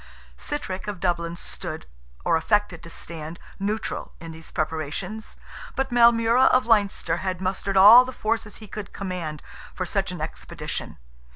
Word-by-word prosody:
Sitrick 195 Hz, -11 st, -4 dB
of 205 Hz, -3 st, -4 dB
Dublin 170 Hz, -2 st, -1 dB
stood, -, -, -6 dB, 0.4 s
or 165 Hz, -, +3 dB
affected 200 Hz, +1 st, +1 dB
to 170 Hz, -, -10 dB
stand, 165 Hz, -1 st, -7 dB, 0.2 s
neutral 210 Hz, +3 st, -3 dB
in 165 Hz, 0 st, -8 dB
these 160 Hz, 0 st, -11 dB
preparations, 160 Hz, +7 st, -3 dB, 0.4 s
but 270 Hz, -1 st, -1 dB
Maelmurra 235 Hz, +1 st, +5 dB
of 255 Hz, 0 st, +4 dB
Leinster 205 Hz, -7 st, +2 dB
had 185 Hz, -1 st, -3 dB
mustered 190 Hz, +1 st, -1 dB
all 215 Hz, +6 st, +10 dB
the 255 Hz, -, -6 dB
forces 220 Hz, -2 st, -2 dB
he 220 Hz, -, -11 dB
could 205 Hz, 0 st, -7 dB
command 180 Hz, -6 st, -5 dB, 0.3 s
for -, -, -2 dB
such -, -, -1 dB
an -, -, -6 dB
expedition. -, -, -5 dB
195 Hz, 150 wpm, -25 LUFS, 170-220 Hz, 0.4 s, all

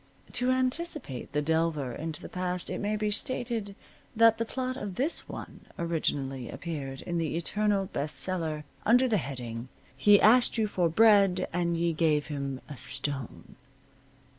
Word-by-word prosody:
To 250 Hz, +1 st, 0 dB
anticipate 255 Hz, -, -1 dB
the 150 Hz, +1 st, 0 dB
delver 160 Hz, -4 st, 0 dB
into 160 Hz, +4 st, -5 dB
the -, -, -6 dB
past 180 Hz, -1 st, -3 dB
it -, -, -3 dB
may 210 Hz, +1 st, -1 dB
be 210 Hz, 0 st, -1 dB
stated 225 Hz, -2 st, -2 dB, 0.4 s
that 225 Hz, 0 st, +5 dB
the 230 Hz, -, 0 dB
plot 255 Hz, +2 st, -3 dB
of 205 Hz, -6 st, -5 dB
this 285 Hz, -, 0 dB
one -, -, -9 dB
originally 140 Hz, -6 st, -1 dB
appeared 140 Hz, -6 st, -5 dB
in 175 Hz, -1 st, -2 dB
the 160 Hz, -1 st, -1 dB
Eternal 205 Hz, +3 st, +1 dB
Best 150 Hz, -4 st, -3 dB
Seller, 160 Hz, -5 st, -1 dB, 0.2 s
under 245 Hz, +4 st, +5 dB
the 220 Hz, -4 st, +2 dB
heading, 125 Hz, -6 st, -5 dB, 0.3 s
"He 205 Hz, +9 st, +6 dB
Asked 240 Hz, +3 st, +5 dB
You 220 Hz, -, +2 dB
For 180 Hz, -5 st, +1 dB
Bread, 195 Hz, -1 st, +5 dB
and 170 Hz, -1 st, 0 dB
Ye 170 Hz, 0 st, +1 dB
Gave 155 Hz, -2 st, +2 dB
Him 140 Hz, -2 st, -4 dB
a 145 Hz, -, -8 dB
Stone." 135 Hz, -1 st, -4 dB
175 Hz, 160 wpm, -29 LUFS, 150-215 Hz, 0.4 s, He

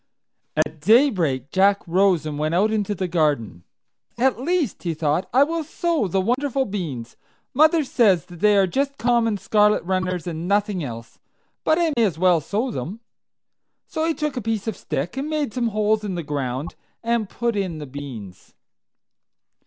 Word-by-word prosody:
At 155 Hz, 0 st, 0 dB
daybreak 175 Hz, -, +3 dB
Jack 195 Hz, +1 st, +3 dB
rose 180 Hz, -2 st, +3 dB
and 150 Hz, -1 st, -4 dB
went 155 Hz, +2 st, 0 dB
out 210 Hz, +4 st, +3 dB
into 210 Hz, -1 st, -1 dB
the 185 Hz, 0 st, -2 dB
garden. 145 Hz, -, 0 dB, 0.5 s
"At 255 Hz, -1 st, +2 dB
least," 320 Hz, -, -1 dB
he 170 Hz, -3 st, -2 dB
thought, 155 Hz, +3 st, 0 dB
"I 260 Hz, +3 st, +5 dB
will 325 Hz, +2 st, -2 dB
sow 325 Hz, -, -1 dB
the 190 Hz, +2 st, 0 dB
wonderful 265 Hz, +6 st, 0 dB
beans. 155 Hz, -, -5 dB, 0.4 s
Mother 310 Hz, +3 st, +4 dB
says 205 Hz, -, +3 dB
that 175 Hz, -1 st, -13 dB
they 210 Hz, +1 st, +4 dB
are 195 Hz, -, +5 dB
just 275 Hz, +9 st, -1 dB
common 235 Hz, -3 st, +2 dB
scarlet 210 Hz, +2 st, +2 dB
runners, 185 Hz, -1 st, -1 dB
and 170 Hz, 0 st, -4 dB
nothing 200 Hz, -2 st, +1 dB
else; 115 Hz, -3 st, -8 dB, 0.4 s
but 315 Hz, -, +3 dB
I 335 Hz, -3 st, +1 dB
may 235 Hz, -, +3 dB
as 190 Hz, -7 st, 0 dB
well 180 Hz, -2 st, +3 dB
sow 220 Hz, -, -2 dB
them." 195 Hz, -, -5 dB, 0.8 s
So 315 Hz, -, -3 dB
he 325 Hz, -1 st, 0 dB
took 300 Hz, -2 st, -2 dB
a 250 Hz, -, -2 dB
piece 220 Hz, -2 st, -2 dB
of 220 Hz, -, -2 dB
stick, 160 Hz, -, -4 dB
and 280 Hz, +3 st, -2 dB
made 300 Hz, -6 st, -1 dB
some 245 Hz, -2 st, 0 dB
holes 215 Hz, 0 st, +1 dB
in 195 Hz, -3 st, -3 dB
the 170 Hz, -, -3 dB
ground, 140 Hz, 0 st, -3 dB, 0.3 s
and 230 Hz, -3 st, 0 dB
put 235 Hz, -1 st, -2 dB
in 185 Hz, -5 st, -2 dB
the 150 Hz, -, -6 dB
beans. 130 Hz, -9 st, -9 dB
200 Hz, 175 wpm, -22 LUFS, 160-240 Hz, 0.8 s, I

